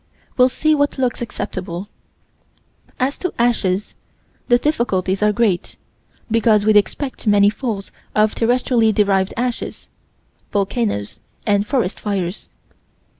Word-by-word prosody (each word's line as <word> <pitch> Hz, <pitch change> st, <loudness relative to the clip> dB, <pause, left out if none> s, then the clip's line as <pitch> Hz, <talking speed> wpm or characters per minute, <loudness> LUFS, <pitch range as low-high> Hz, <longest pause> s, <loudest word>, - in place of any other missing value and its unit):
We'll 250 Hz, 0 st, +5 dB
see 310 Hz, +4 st, +1 dB
what 285 Hz, -1 st, +1 dB
looks 255 Hz, -2 st, -1 dB
acceptable. 185 Hz, -5 st, -5 dB, 1.1 s
As 265 Hz, +3 st, 0 dB
to 360 Hz, -, -2 dB
ashes, 210 Hz, -5 st, +1 dB, 0.5 s
the 240 Hz, -, +5 dB
difficulties 215 Hz, -, 0 dB
are 210 Hz, 0 st, +4 dB
great, 205 Hz, -4 st, 0 dB, 0.6 s
because 220 Hz, -2 st, +3 dB
we'd 215 Hz, -1 st, +4 dB
expect 245 Hz, +4 st, 0 dB
many 205 Hz, 0 st, +5 dB
falls 215 Hz, -5 st, -4 dB, 0.2 s
of 215 Hz, 0 st, +3 dB
terrestrially 240 Hz, -1 st, +2 dB
derived 195 Hz, -2 st, +2 dB
ashes 245 Hz, 0 st, -3 dB, 0.6 s
volcanoes 200 Hz, -, -1 dB, 0.3 s
and 205 Hz, 0 st, +2 dB
forest 225 Hz, -8 st, -1 dB
fires. 195 Hz, -3 st, -3 dB
215 Hz, 115 wpm, -19 LUFS, 200-245 Hz, 1.1 s, We'll